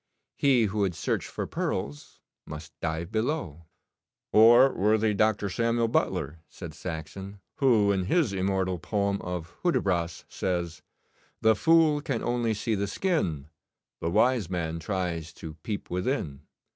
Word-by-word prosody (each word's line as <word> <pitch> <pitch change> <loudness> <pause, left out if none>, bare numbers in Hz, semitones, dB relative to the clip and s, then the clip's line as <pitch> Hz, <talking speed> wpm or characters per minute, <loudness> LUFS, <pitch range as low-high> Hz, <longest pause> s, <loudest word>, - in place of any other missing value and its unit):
He 130 -4 +3
who 105 0 -1
would 95 -4 +1
search - - -2
for - - -4
pearls 75 +1 -4 0.3
must 75 +1 -8
dive 85 +2 -3
below."' 110 - -2 0.7
'Or 120 +5 +7
worthy 105 +2 +2
Dr. 105 0 +1
Samuel 115 +3 0
Butler,' 80 -7 -1
said 85 -4 -9
Saxon, 90 +5 -7 0.2
'who, 115 -8 +4
in 95 -2 0
his 145 - +2
immortal 95 -1 0
poem 100 +2 -1
of 90 -2 -5
"Hudibras," 90 - 0
says 85 -3 -3 0.6
"The 110 0 +5
fool 160 +2 +4
can 135 -6 -2
only 120 -2 0
see 110 +2 -2
the 100 -1 -1
skin: 95 - -1 0.5
The 85 - -2
wise 120 0 +2
man 85 -3 -2
tries 85 -2 -3
to 80 -1 -8
peep 105 +2 -5
within." 90 - -2
100 Hz, 135 wpm, -27 LUFS, 85-115 Hz, 0.7 s, Or